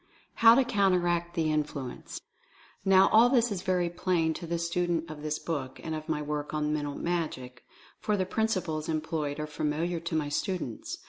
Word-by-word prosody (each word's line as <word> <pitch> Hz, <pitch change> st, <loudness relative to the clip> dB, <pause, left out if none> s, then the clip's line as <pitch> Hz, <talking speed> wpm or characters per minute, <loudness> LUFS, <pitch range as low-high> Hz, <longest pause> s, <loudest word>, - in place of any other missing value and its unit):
HOW 230 Hz, 0 st, +8 dB
TO 265 Hz, 0 st, +4 dB
COUNTERACT 180 Hz, -6 st, +1 dB
THE 160 Hz, -2 st, +1 dB
INFLUENCE. 150 Hz, -4 st, -4 dB, 0.6 s
Now, 195 Hz, 0 st, +6 dB
all 230 Hz, +3 st, +6 dB
this 240 Hz, -3 st, +3 dB
is 190 Hz, -3 st, -3 dB
very 180 Hz, -2 st, +1 dB
plain 170 Hz, -2 st, 0 dB
to 170 Hz, -, -7 dB
the 170 Hz, +1 st, -1 dB
student 170 Hz, 0 st, -1 dB
of 150 Hz, -1 st, -9 dB
this 150 Hz, 0 st, -2 dB
book, 140 Hz, -7 st, -4 dB
and 160 Hz, -, -3 dB
of 155 Hz, +1 st, -6 dB
my 150 Hz, -1 st, -1 dB
work 150 Hz, 0 st, -3 dB
on 150 Hz, 0 st, 0 dB
"Mental 145 Hz, -2 st, -2 dB
Magic," 155 Hz, -8 st, -3 dB, 0.4 s
for 210 Hz, -1 st, 0 dB
the 185 Hz, -, 0 dB
principles 185 Hz, -7 st, -1 dB
employed 155 Hz, -2 st, -2 dB
are 150 Hz, -, -2 dB
familiar 155 Hz, +3 st, -2 dB
to 170 Hz, 0 st, -4 dB
my 155 Hz, -2 st, 0 dB
students. 150 Hz, -, -3 dB
165 Hz, 180 wpm, -29 LUFS, 150-185 Hz, 0.6 s, HOW